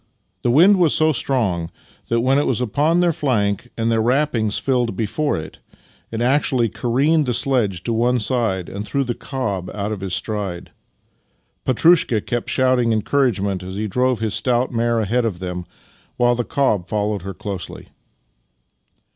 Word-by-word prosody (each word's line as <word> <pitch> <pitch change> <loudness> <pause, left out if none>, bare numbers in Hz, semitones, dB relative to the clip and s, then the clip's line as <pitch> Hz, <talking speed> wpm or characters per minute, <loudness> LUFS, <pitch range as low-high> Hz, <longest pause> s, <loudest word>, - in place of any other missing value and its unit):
The - - 0
wind 175 +11 +6
was 170 -5 +3
so 155 0 +3
strong 105 - -1 0.4
that 115 0 +1
when 135 +3 +3
it 145 - 0
was 125 - 0
upon 145 +8 +1
their 175 -1 +2
flank 115 -6 -1
and 115 0 0
their 115 -1 +2
wrappings 120 -3 +1
filled 125 -5 0
before 145 +9 -1
it, 80 -1 -8 0.5
it 115 0 -4
actually 130 -2 +2
careened 140 +8 +1
the 125 - +1
s^.edge 115 - 0
to 115 - -1
one 120 +2 +2
side 110 -6 0
and 100 +1 -5
threw 140 +6 -1
the 125 -2 -2
cob 100 -10 -4
out 105 0 -3
of 105 -3 -4
his 95 -2 -2
stride. 100 -5 -4 0.9
Petrushka 135 -3 +4
kept 120 +2 -3
shouting 130 -2 +2
en 110 -2 +1
couragement 100 -9 0
as 95 +1 -7
he 105 +2 -2
drove 125 +3 0
his 110 -2 -1
stout 120 +3 +1
mare 115 -1 +1
ahead 115 +4 0
of 110 -6 -2
them, 90 -1 -5 0.5
while 120 0 +3
the 120 0 -1
cob 105 -10 0
followed 105 -1 -1
her 95 +1 -7
closely. 95 -2 -7
115 Hz, 170 wpm, -20 LUFS, 100-130 Hz, 0.9 s, wind